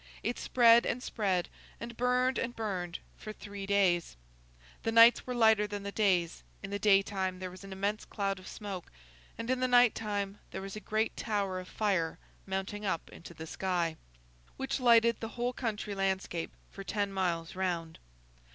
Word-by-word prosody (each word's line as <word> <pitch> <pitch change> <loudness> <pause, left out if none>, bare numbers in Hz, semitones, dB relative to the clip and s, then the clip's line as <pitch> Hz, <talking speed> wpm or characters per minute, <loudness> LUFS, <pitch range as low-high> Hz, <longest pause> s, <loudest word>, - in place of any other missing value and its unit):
It 240 +2 -2
spread 235 -1 +6
and 250 - -2
spread, 190 -5 0 0.3
and 235 0 -7
burned 250 +2 +2
and 240 -1 -3
burned, 185 -6 -3 0.2
for 215 - -6
three 200 -2 -8
days. 185 - +2 0.6
The 225 - -1
nights 230 +2 +7
were 250 - -2
lighter 220 -3 +5
than 205 -1 -5
the 200 - -4
days; 185 -6 +1 0.2
in 195 - -6
the 200 - -2
daytime 195 -2 +2
there 185 0 -5
was 185 +2 -12
an 195 - -10
immense 200 +2 -1
cloud 195 -2 -2
of 185 - -12
smoke, 195 -4 -7 0.5
and 230 +1 -5
in 255 - +1
the 255 - +2
night 245 -2 +6
time 205 -2 -3
there - - -6
was 195 +1 -6
a - - -5
great 215 +1 -1
tower 200 -4 -1
of 185 - -9
fire 190 -7 0 0.3
mounting 195 +2 -3
up 185 -5 -2
into 170 0 -11
the 160 - -7
sky, 175 -1 -1 0.6
which 270 +1 -2
lighted 235 -2 +5
the 225 - -4
whole 245 +1 0
country 220 -4 -3
landscape 190 -3 -1 0.2
for 195 - -8
ten 200 -1 -2
miles 175 -3 -1
round. 175 -3 -2
200 Hz, 180 wpm, -31 LUFS, 185-225 Hz, 0.6 s, nights